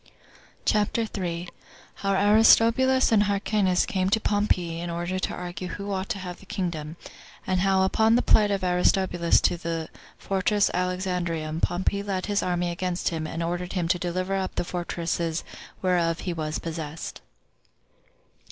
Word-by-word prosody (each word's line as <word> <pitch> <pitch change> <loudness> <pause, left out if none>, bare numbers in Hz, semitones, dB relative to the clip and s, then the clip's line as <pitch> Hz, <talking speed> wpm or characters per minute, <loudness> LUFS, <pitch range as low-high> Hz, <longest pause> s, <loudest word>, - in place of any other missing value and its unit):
CHAPTER 215 +2 +1
3. 175 -4 -4 0.5
How 195 0 0
Aristobulus 225 +6 +5
And 210 -2 +4
Hyrcanus 200 -2 +1
Came 190 -1 0
To 220 - +3
Pompey 185 -6 0
In 175 0 -4
Order 175 +2 -2
To - - -2
Argue 180 0 -6
Who 200 +3 -5
Ought 190 +1 -3
To 230 - -1
Have 180 -2 -7
The 195 - -17
Kingdom; 165 -6 -3 0.5
And 185 -1 +1
How 190 0 +3
Upon 220 +4 +3
The 245 - +3
Plight 210 -1 +4
Of 200 -2 -1
Aristobulus 180 -1 +2
To 175 - +2
The 165 -1 -4 0.3
Fortress 200 +1 +1
Alexandrium 180 -3 -2
Pompey 190 +3 0
Led 195 -2 -2
His 205 -1 0
Army 175 -1 -1
Against 180 +1 -2
Him 160 -2 -3
And 165 +1 -4
Ordered 175 +1 -3
Him 180 -3 -1
To 180 - +2
Deliver 185 +2 -2
Up 190 -1 -3
The - - 0
Fortresses 170 -1 -2 0.4
Whereof 170 -2 +1
He 180 - -3
Was 155 -1 -3
Possessed. 160 -1 -6
180 Hz, 155 wpm, -26 LUFS, 170-200 Hz, 0.5 s, Aristobulus